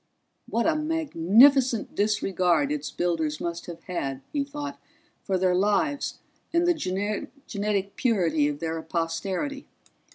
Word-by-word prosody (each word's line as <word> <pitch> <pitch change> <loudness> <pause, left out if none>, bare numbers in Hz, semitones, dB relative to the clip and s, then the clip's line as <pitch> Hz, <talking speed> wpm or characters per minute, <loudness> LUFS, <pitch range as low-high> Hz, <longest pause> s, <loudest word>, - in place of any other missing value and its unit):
What 235 - 0
a 325 - +3
magnificent 270 - +4
disregard 205 - +1
its 300 -2 -2
builders 160 -4 -1
must 170 0 -4
have 170 -1 -8
had, 135 -7 -4
he 285 -2 +1
thought, 290 +1 -6 0.4
for 190 -2 0
their 185 0 +2
lives 210 +10 +1 0.3
and 340 +1 +2
the 350 - +4 0.7
genetic 200 -1 -2
purity 170 - +2
of 145 -1 -2
their 160 +1 -3
posterity! 180 - -3
200 Hz, 125 wpm, -26 LUFS, 170-280 Hz, 0.7 s, magnificent